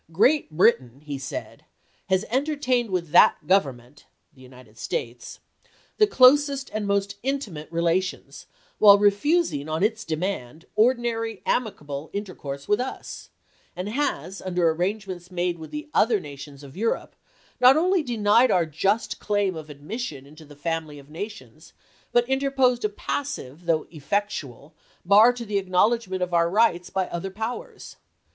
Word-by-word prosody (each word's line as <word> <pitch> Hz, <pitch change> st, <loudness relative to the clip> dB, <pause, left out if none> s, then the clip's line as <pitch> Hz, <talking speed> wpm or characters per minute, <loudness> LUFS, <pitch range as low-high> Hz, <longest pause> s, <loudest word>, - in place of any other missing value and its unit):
" -, -, -28 dB
Great 255 Hz, -, +3 dB
Britain," 140 Hz, -, +2 dB
he 145 Hz, -2 st, -5 dB
said, 130 Hz, -, -7 dB, 0.2 s
" -, -, -39 dB
has... 190 Hz, +2 st, +2 dB
entertained 260 Hz, -3 st, 0 dB
with 175 Hz, -4 st, -2 dB
that 175 Hz, -, +7 dB
Government 135 Hz, -8 st, -1 dB, 0.3 s
[the 130 Hz, -, -19 dB
United 125 Hz, -4 st, -16 dB
States] 120 Hz, +1 st, -5 dB, 0.6 s
the 425 Hz, -, +5 dB
closest 280 Hz, -3 st, +4 dB
and 215 Hz, -1 st, -2 dB
most 200 Hz, 0 st, -1 dB
intimate 220 Hz, -, -4 dB
relations, 170 Hz, +2 st, -2 dB, 0.3 s
while 205 Hz, -1 st, +8 dB
refusing, 205 Hz, -, +1 dB
on 160 Hz, +4 st, -1 dB
its 220 Hz, +1 st, 0 dB
demand, 160 Hz, -3 st, -4 dB
ordinary 230 Hz, -1 st, 0 dB
amicable 150 Hz, -, -2 dB
inter 200 Hz, -2 st, -4 dB
course 140 Hz, -2 st, -7 dB
with 210 Hz, -, +2 dB
us, 255 Hz, +1 st, -6 dB, 0.5 s
and 180 Hz, +3 st, -4 dB
has, 225 Hz, -6 st, -2 dB
under 175 Hz, -3 st, +1 dB
arrangements 180 Hz, +1 st, -3 dB
made 175 Hz, -1 st, -2 dB
with 160 Hz, -, -9 dB
the 300 Hz, +1 st, -6 dB
other 220 Hz, -1 st, +3 dB
nations 145 Hz, -3 st, -10 dB
of 140 Hz, -1 st, -12 dB
Europe, 225 Hz, +4 st, -2 dB, 0.4 s
not 255 Hz, +3 st, +7 dB
only 365 Hz, +2 st, +2 dB
denied 235 Hz, -2 st, +3 dB
our 175 Hz, -2 st, +3 dB
just 195 Hz, +8 st, -1 dB
claim 205 Hz, -3 st, 0 dB
of 155 Hz, -1 st, -8 dB
admission 150 Hz, -, -6 dB
into 155 Hz, +2 st, -15 dB
the 145 Hz, 0 st, -14 dB
family 160 Hz, 0 st, -4 dB
of 140 Hz, +1 st, -15 dB
nations, 205 Hz, +7 st, -9 dB, 0.4 s
but 240 Hz, 0 st, +3 dB
interposed 265 Hz, -2 st, +1 dB
a 215 Hz, -, +1 dB
passive, 200 Hz, -, -5 dB
though 160 Hz, -2 st, +1 dB
effectual, 155 Hz, -, -4 dB, 0.3 s
bar 210 Hz, +6 st, +7 dB
to 245 Hz, -1 st, -7 dB
the 205 Hz, -2 st, 0 dB
acknowledgment 190 Hz, +1 st, +1 dB
of 180 Hz, -1 st, -4 dB
our 170 Hz, 0 st, +3 dB
rights 180 Hz, -3 st, +2 dB
by 190 Hz, -1 st, -1 dB
other 175 Hz, +3 st, -4 dB
powers. 220 Hz, +5 st, -7 dB
190 Hz, 150 wpm, -24 LUFS, 155-230 Hz, 0.6 s, while